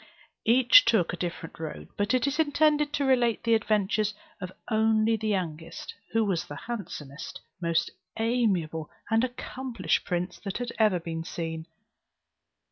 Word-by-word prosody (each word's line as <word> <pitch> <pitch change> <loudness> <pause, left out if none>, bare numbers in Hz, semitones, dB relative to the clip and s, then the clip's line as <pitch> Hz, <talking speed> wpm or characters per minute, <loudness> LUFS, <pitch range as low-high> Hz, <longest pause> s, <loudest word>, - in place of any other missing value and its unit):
Each 250 +2 +8
took 220 -8 +2
a - - -1
different 170 -2 -5
road; 160 -2 -6
but 205 +5 +1
it 255 - +2
is 285 +2 -1
intended 300 -1 +3
to 285 -1 +1
relate 245 -4 +2
the 230 -1 +3
adventures 215 -1 +1 0.3
of 185 0 -5 0.2
only 220 0 +3
the 220 0 -3
youngest, 170 -5 -3 0.2
who 225 -1 +2
was 180 -4 0
the 145 - -7
handsomest, 155 - -6 0.2
most 170 -1 +1 0.3
amiable, 195 -10 0 0.2
and 225 +1 +4
accomplished 250 -7 -2
prince 180 +1 -2
that 195 -3 -4
had 245 -1 -3
ever 210 -5 +4
been 165 -1 -4
seen. 165 -1 -5
215 Hz, 145 wpm, -28 LUFS, 170-240 Hz, 0.3 s, Each